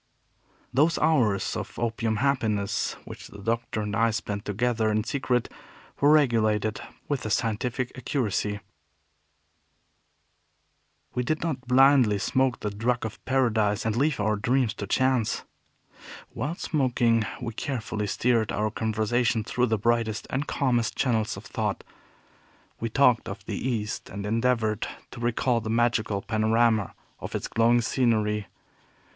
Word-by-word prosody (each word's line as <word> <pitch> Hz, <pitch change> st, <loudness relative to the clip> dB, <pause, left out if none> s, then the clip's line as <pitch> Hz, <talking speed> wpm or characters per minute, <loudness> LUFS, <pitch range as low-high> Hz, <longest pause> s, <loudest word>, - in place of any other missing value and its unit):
Those 155 Hz, +6 st, +3 dB
hours 120 Hz, -12 st, +2 dB
of -, -, -6 dB
opium 115 Hz, -1 st, -1 dB
happiness 110 Hz, -5 st, 0 dB
which -, -, -9 dB
the -, -, -12 dB
Doctor 115 Hz, +1 st, -2 dB
and 105 Hz, -1 st, -3 dB
I 115 Hz, +1 st, +3 dB
spent 105 Hz, -2 st, -3 dB
together 110 Hz, +1 st, 0 dB
in 110 Hz, 0 st, +1 dB
secret 125 Hz, -2 st, 0 dB, 0.5 s
were 145 Hz, +1 st, +5 dB
regulated 110 Hz, -7 st, +2 dB, 0.3 s
with 140 Hz, -4 st, -2 dB
a 110 Hz, -, -3 dB
scientific 120 Hz, +3 st, -1 dB
accuracy. 105 Hz, -5 st, -1 dB, 2.5 s
We 125 Hz, -, 0 dB
did 155 Hz, +6 st, -1 dB
not 135 Hz, -7 st, -3 dB
blindly 130 Hz, -4 st, +5 dB
smoke 130 Hz, +5 st, 0 dB
the 105 Hz, -, -2 dB
drug 115 Hz, +4 st, -1 dB
of 110 Hz, -, -7 dB
paradise, 110 Hz, -5 st, +1 dB
and 110 Hz, -1 st, 0 dB
leave 140 Hz, +2 st, +1 dB
our 105 Hz, 0 st, +1 dB
dreams 125 Hz, +2 st, +1 dB
to 100 Hz, -, -4 dB
chance. 130 Hz, 0 st, +1 dB, 0.9 s
While 145 Hz, +8 st, -3 dB
smoking, 125 Hz, -8 st, +1 dB, 0.2 s
we 120 Hz, -3 st, -5 dB
carefully 110 Hz, -5 st, -3 dB
steered 115 Hz, +1 st, +1 dB
our 105 Hz, +1 st, -1 dB
conversation 110 Hz, +1 st, 0 dB
through 125 Hz, +3 st, 0 dB
the 110 Hz, -1 st, +1 dB
brightest 115 Hz, 0 st, 0 dB
and 140 Hz, +2 st, -1 dB
calmest 120 Hz, -5 st, 0 dB
channels 110 Hz, -4 st, 0 dB
of -, -, -10 dB
thought. -, -, -2 dB, 1.0 s
We 115 Hz, -, -2 dB
talked 125 Hz, -1 st, +3 dB
of -, -, -8 dB
the -, -, -3 dB
East, 105 Hz, -3 st, -3 dB
and 100 Hz, +1 st, -6 dB
endeavored 115 Hz, -1 st, +1 dB, 0.2 s
to -, -, -9 dB
recall 120 Hz, 0 st, +1 dB
the 110 Hz, -, -5 dB
magical 110 Hz, -3 st, +1 dB
panorama 110 Hz, -1 st, +2 dB, 0.2 s
of -, -, -6 dB
its -, -, -2 dB
glowing 120 Hz, +2 st, +3 dB
scenery. 110 Hz, -4 st, +1 dB
115 Hz, 135 wpm, -26 LUFS, 110-125 Hz, 2.5 s, were